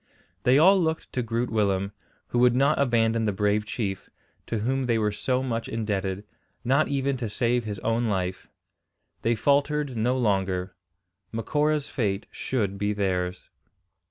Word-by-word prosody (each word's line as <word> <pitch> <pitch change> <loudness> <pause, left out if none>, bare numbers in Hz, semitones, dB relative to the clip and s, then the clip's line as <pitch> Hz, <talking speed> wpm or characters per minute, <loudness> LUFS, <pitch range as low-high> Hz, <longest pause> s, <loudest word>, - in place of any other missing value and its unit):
They 125 +2 +6
all 190 +5 +6
looked 160 -1 -2
to 125 - 0
Groot 115 +1 -2
Willem, 100 -3 +1 0.4
who 120 - 0
would 125 0 +5
not 135 +2 +3
abandon 115 -4 +2
the 105 - +2
brave 105 +1 0
chief, 100 -4 -3 0.4
to 115 - -1
whom 130 +5 0
they 115 -2 +2
were 105 -1 +1
so 125 +5 -1
much 115 -3 -3
indebted, 100 -3 -2 0.4
not 135 +5 +3
even 140 -1 0
to 120 -3 -3
save 120 +2 0
his 105 -2 -4
own 115 +1 0
life. 95 -3 -2 0.7
They 115 +1 +2
faltered 145 +2 +1
no 120 +3 +1
longer. 95 -5 0 0.6
Macora's 150 +6 0
fate 105 -6 -1
should 100 -6 -2
be 105 +1 0
theirs. 90 -3 -2
115 Hz, 155 wpm, -26 LUFS, 100-130 Hz, 0.7 s, They